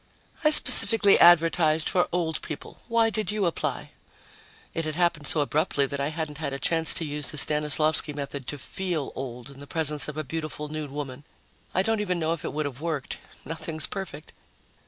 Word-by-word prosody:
"I 305 - +5
specifically 225 -8 +5
advertised 165 -2 +5
for 180 - +2
old 165 -3 -1
people. 155 - -8
Why 230 -1 +2
did 215 -1 -2
you 210 -2 0
apply?" 170 - -3 0.8
It 165 - -2
had 155 -1 -3
happened 170 -4 0
so 155 - +3
abruptly 145 -1 +1
that 140 +1 -5
I 140 - 0
hadn't 155 -1 -5
had 140 -3 -3
a - - -3
chance 165 +4 +2
to 165 - +2
use 150 -1 -3
the 150 - -5
Stanislavsky 150 +1 +3
method 140 -2 -6
to 145 - -4
feel 170 0 -4
old 125 0 -7
in 140 - -14
the 145 - -11
presence 150 -2 +1
of 150 0 -6
a 155 - -2
beautiful 155 0 -5
nude 155 -1 -5
woman. 140 -1 -6 0.5
I 185 - +3
don't 225 +1 0
even 180 -3 -1
know 165 -1 0
if 165 - -7
it - - -3
would 155 0 -2
have 140 -1 -6
worked. 155 -5 -3 0.3
Nothing's 160 -1 -3
perfect. 170 -6 -7
155 Hz, 195 wpm, -26 LUFS, 145-170 Hz, 0.8 s, I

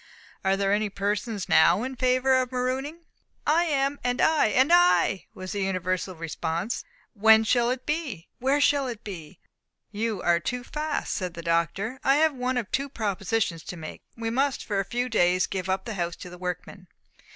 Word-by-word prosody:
Are 195 0 +2
there 195 0 +1
any 210 0 +1
persons 205 0 -2
now 170 +6 +5
in 260 +1 -4
favour 255 +1 +2
of 255 0 -4
marooning?" 260 +6 -2 0.4
"I 330 +3 +3
am 280 -2 0
and 245 0 0
I 315 -6 +4
and 260 +9 +3
I!" 350 - +4
was 185 -1 -7
the 200 - -2
universal 185 -1 -1
response. 165 +5 -3 0.3
"When 220 +1 +6
shall 240 +1 +2
it 255 0 -3
be? 295 - -3
Where 270 +3 +2
shall 285 -1 +3
it 235 -2 -6
be?" 175 -4 -8 0.5
"You 215 -1 -2
are 170 -1 +3
too 245 +8 -3
fast," 300 +4 -3
said 180 -3 -3
the 170 - -7
Doctor. 170 +9 -1
"I 270 - +4
have 315 +1 +3
one 255 0 -2
of 230 -6 -3
two 275 +1 -1
propositions 200 - -1
to 180 - -7
make. 155 -1 -8 0.2
We 225 0 -2
must 270 +3 0
for 205 -2 -1
a 195 - -1
few 245 +5 -2
days 185 -5 +3
give 190 -1 -4
up 190 0 -1
the 230 - -4
house 175 -3 -2
to 180 - -10
the 180 - -11
workmen. 180 +1 -6
220 Hz, 190 wpm, -26 LUFS, 185-260 Hz, 0.5 s, When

